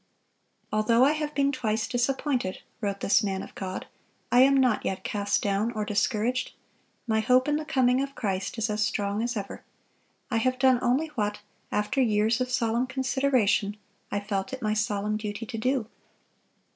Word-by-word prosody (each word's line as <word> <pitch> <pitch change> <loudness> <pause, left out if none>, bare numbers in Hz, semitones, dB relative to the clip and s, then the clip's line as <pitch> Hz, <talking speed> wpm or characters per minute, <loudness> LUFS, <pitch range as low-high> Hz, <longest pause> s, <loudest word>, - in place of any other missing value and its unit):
"Although 230 +4 +4
I 285 - +5
have 300 -1 -3
been 280 0 +2
twice 225 -5 -1
disappointed," 245 -4 -1 0.2
wrote 200 -2 -2
this 205 - +4
man 195 -3 -2
of - - -11
God, 185 -1 -5 0.5
"I 245 - +5
am 275 +1 +6
not 255 -5 +3
yet 190 - -3
cast 205 -4 -1
down 205 +3 +1
or 215 -2 -2
discouraged.... 215 +4 0 0.5
My 220 -2 +1
hope 250 +4 +3
in 295 0 +2
the 305 - -4
coming 255 -2 +2
of 275 0 -4
Christ 195 -1 -2
is 225 0 0
as 210 0 -1
strong 205 0 0
as 240 0 -2
ever. 200 -1 -6 0.7
I 230 - +2
have 255 +3 +1
done 260 -1 +4
only 270 +6 +1
what, 210 -6 -2 0.3
after 210 +6 0
years 220 +1 +2
of 255 - -1
solemn 240 0 +1
consideration, 260 -6 +1 0.3
I 205 - 0
felt 200 +2 -3
it 260 - -5
my 215 0 +1
solemn 210 0 0
duty 210 +1 -5
to 225 0 -6
do. 255 0 0
225 Hz, 175 wpm, -27 LUFS, 210-255 Hz, 0.7 s, am